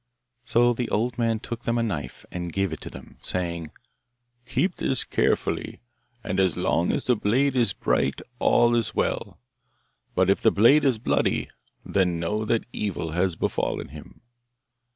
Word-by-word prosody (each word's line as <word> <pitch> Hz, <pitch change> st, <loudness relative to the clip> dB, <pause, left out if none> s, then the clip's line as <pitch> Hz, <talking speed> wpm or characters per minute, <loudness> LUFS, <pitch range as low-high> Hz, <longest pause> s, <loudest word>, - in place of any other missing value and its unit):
So 120 Hz, +1 st, +3 dB
the 120 Hz, 0 st, -3 dB
old 120 Hz, +2 st, -1 dB
man 115 Hz, -2 st, +1 dB
took 120 Hz, +1 st, -6 dB
them 115 Hz, 0 st, -1 dB
a 115 Hz, -, +1 dB
knife, 75 Hz, -, -4 dB
and 85 Hz, -1 st, -4 dB
gave 95 Hz, -1 st, -1 dB
it 80 Hz, -, -7 dB
to -, -, -7 dB
them, -, -, -12 dB
saying, 85 Hz, -3 st, -2 dB, 0.8 s
'Keep 135 Hz, +8 st, 0 dB
this 130 Hz, -, +2 dB
carefully, -, -, -1 dB, 0.4 s
and 95 Hz, -, -2 dB
as 95 Hz, -4 st, +2 dB
long 85 Hz, +1 st, +1 dB
as -, -, 0 dB
the 125 Hz, -, +3 dB
blade 130 Hz, +6 st, +1 dB
is 120 Hz, -2 st, +3 dB
bright -, -, 0 dB, 0.2 s
all 120 Hz, 0 st, +4 dB
is 115 Hz, -2 st, 0 dB
well; -, -, -1 dB, 0.8 s
but 95 Hz, 0 st, +3 dB
if 100 Hz, -, +2 dB
the -, -, +5 dB
blade 135 Hz, +9 st, +5 dB
is 130 Hz, -4 st, +3 dB
bloody, 110 Hz, -, 0 dB, 0.3 s
then 90 Hz, -3 st, +1 dB
know 105 Hz, +6 st, -1 dB
that 115 Hz, +1 st, 0 dB
evil 95 Hz, -6 st, -3 dB
has 90 Hz, +1 st, 0 dB
befallen -, -, -2 dB
him. -, -, -13 dB
110 Hz, 165 wpm, -25 LUFS, 90-120 Hz, 0.8 s, the